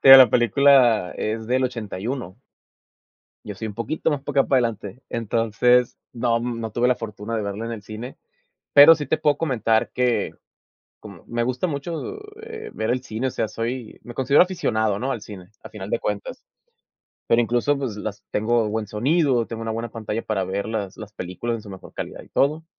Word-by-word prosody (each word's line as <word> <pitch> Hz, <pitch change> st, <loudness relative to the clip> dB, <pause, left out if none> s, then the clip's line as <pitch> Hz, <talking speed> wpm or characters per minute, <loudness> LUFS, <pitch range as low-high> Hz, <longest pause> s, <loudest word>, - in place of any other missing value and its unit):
Pero 135 Hz, 0 st, +11 dB
la 130 Hz, -, +9 dB
película 120 Hz, -5 st, +4 dB
es 110 Hz, +1 st, -3 dB
del 130 Hz, +2 st, +1 dB
81. 115 Hz, -2 st, -4 dB, 1.1 s
Yo 105 Hz, -, -6 dB
soy 110 Hz, +4 st, -5 dB
un 105 Hz, -, -7 dB
poquito 135 Hz, +8 st, -1 dB
más 145 Hz, -2 st, -2 dB
para 145 Hz, -1 st, +1 dB
acá -, -, +1 dB
para 135 Hz, -, +4 dB
adelante. 105 Hz, +1 st, -7 dB
Entonces, 115 Hz, +2 st, +2 dB, 0.2 s
no 115 Hz, -1 st, +1 dB
no 115 Hz, -3 st, -4 dB
tuve 120 Hz, +2 st, +2 dB
la 125 Hz, -, +3 dB
fortuna 110 Hz, 0 st, -5 dB
de 110 Hz, -, -1 dB
verla 100 Hz, +3 st, -4 dB
en 115 Hz, -, -4 dB
el 110 Hz, -, -7 dB
cine. 110 Hz, +5 st, -8 dB, 0.5 s
Pero 145 Hz, +3 st, +10 dB
sí 150 Hz, -4 st, -5 dB
te 155 Hz, -, +1 dB
puedo 145 Hz, -2 st, +2 dB
comentar 115 Hz, -7 st, +1 dB
que, 125 Hz, -2 st, +1 dB, 0.7 s
como -, -, -13 dB
me 120 Hz, 0 st, -1 dB
gusta 130 Hz, +8 st, -1 dB
mucho, 165 Hz, -, -4 dB, 0.2 s
eh, 445 Hz, -1 st, -8 dB
ver 110 Hz, +2 st, -1 dB
el 125 Hz, 0 st, 0 dB
cine, 120 Hz, +2 st, -3 dB
o -, -, -3 dB
sea, 110 Hz, -, -1 dB
soy 115 Hz, +2 st, -5 dB
me 120 Hz, -, -10 dB
considero 140 Hz, +5 st, +5 dB
aficionado, 110 Hz, -, 0 dB
¿no?, 135 Hz, +2 st, -1 dB
al 115 Hz, -, -4 dB
cine, 100 Hz, -3 st, -11 dB
a -, -, -9 dB
final -, -, -8 dB
de -, -, 0 dB
cuentas. -, -, -4 dB, 0.8 s
Pero 115 Hz, -, +4 dB
incluso, 120 Hz, +5 st, +1 dB
pues, 130 Hz, -7 st, -4 dB
las 105 Hz, -1 st, -6 dB
tengo 110 Hz, +1 st, +1 dB
buen 110 Hz, 0 st, -2 dB
sonido, 130 Hz, -, +1 dB
tengo 115 Hz, -1 st, -6 dB
una 110 Hz, 0 st, -2 dB
buena 115 Hz, +1 st, -3 dB
pantalla 115 Hz, 0 st, -4 dB
para 100 Hz, -3 st, -1 dB
ver 95 Hz, +3 st, -3 dB
las 105 Hz, -4 st, -4 dB
las 105 Hz, -1 st, -9 dB
películas 105 Hz, +6 st, -4 dB
en 110 Hz, -, -10 dB
su 100 Hz, -, -11 dB
mejor 95 Hz, -1 st, -11 dB
calidad -, -, -6 dB
y -, -, -18 dB
todo. 155 Hz, +3 st, +1 dB
115 Hz, 200 wpm, -23 LUFS, 110-130 Hz, 1.1 s, Pero